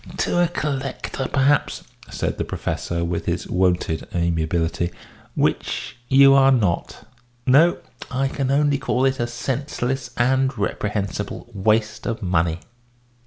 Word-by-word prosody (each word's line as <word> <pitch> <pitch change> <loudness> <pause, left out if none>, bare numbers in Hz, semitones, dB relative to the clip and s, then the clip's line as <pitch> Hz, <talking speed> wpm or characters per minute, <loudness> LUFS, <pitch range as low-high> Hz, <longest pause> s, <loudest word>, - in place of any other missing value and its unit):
"To 175 0 +2
a - - +3
collector, 135 -4 -3
perhaps," 140 +1 +2 0.3
said - - -3
the - - +1
Professor, 85 0 -3
with 85 0 -3
his - - -2
wonted 90 -3 0
amiability, 85 0 0 0.5
"which - - -1
you 135 +1 +7
are 135 0 +6
not. 100 -10 0 0.4
No, 150 +7 +5 0.3
I 135 +2 0
can 135 -1 -2
only 140 0 +2
call 130 -1 0
it 135 0 +1
a 120 - 0
senseless 125 +1 -3
and 130 +1 +2
reprehensible 100 -1 -3
waste 110 +2 0
of 115 -3 -3
money." 85 -2 0
120 Hz, 125 wpm, -22 LUFS, 90-135 Hz, 0.5 s, you